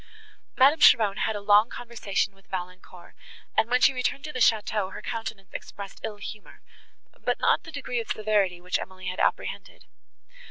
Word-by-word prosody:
Madame 280 +5 +6
Cheron 215 -8 +6
had 220 - 0
a - - -3
long 205 +3 +5
conversation 215 -5 -3
with 195 0 -25
Valancourt, 180 -1 -8 0.4
and, 225 - +2
when 250 +1 +3
she - - +6
returned 265 +2 -2
to 300 - -6
the 255 - -4
château, 215 -4 +2
her - - -8
countenance 225 -5 -6
expressed 200 -1 -8
ill 215 -2 -4
humour, 210 0 -10 0.6
but - - 0
not - - +3
the 325 - -11
degree 270 -4 -3
of 230 - -5
severity, 205 -4 +1
which 180 +1 -1
Emily 185 0 -6
had 185 - -6
apprehended. - - -2
210 Hz, 170 wpm, -26 LUFS, 195-240 Hz, 0.6 s, Madame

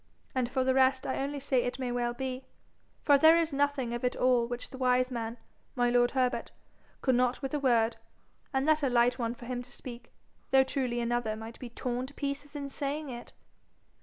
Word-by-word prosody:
And 255 -2 0
for 260 0 0
the 260 0 +2
rest 260 0 +3
I 260 - -1
only 280 +1 -2
say 265 -2 +1
it 245 +1 -3
may 255 -2 -2
well 240 0 -1
be, 260 0 -4 0.6
for 285 -2 +5
there 320 +3 +7
is 330 -2 0
nothing 280 -4 0
of 240 - -4
it 250 - +1
all 250 -2 +3
which 245 0 -6
the 260 - -8
wise 255 0 +2
man, 230 -1 -4 0.4
my 245 -1 +2
lord 245 0 +4
Herbert, 255 0 +1 0.5
could 260 - +2
not 250 +2 +1
with 270 - -3
a 295 - +1
word 235 -4 +2 0.5
and 270 +1 0
that 310 0 +4
a 275 - +2
light 245 +1 +3
one 235 0 -1
for 240 - -11
him 245 0 -3
to 245 0 -13
speak, 240 -1 -10 0.4
though 265 0 +6
truly 255 -3 -1
another 235 -2 -1
might 225 +1 -9
be 250 - -7
torn 250 +2 -3
to 285 - -15
pieces 285 0 -4
in 280 -1 -5
saying 285 +2 -3
it.' 240 -1 -8
255 Hz, 215 wpm, -30 LUFS, 240-275 Hz, 0.6 s, there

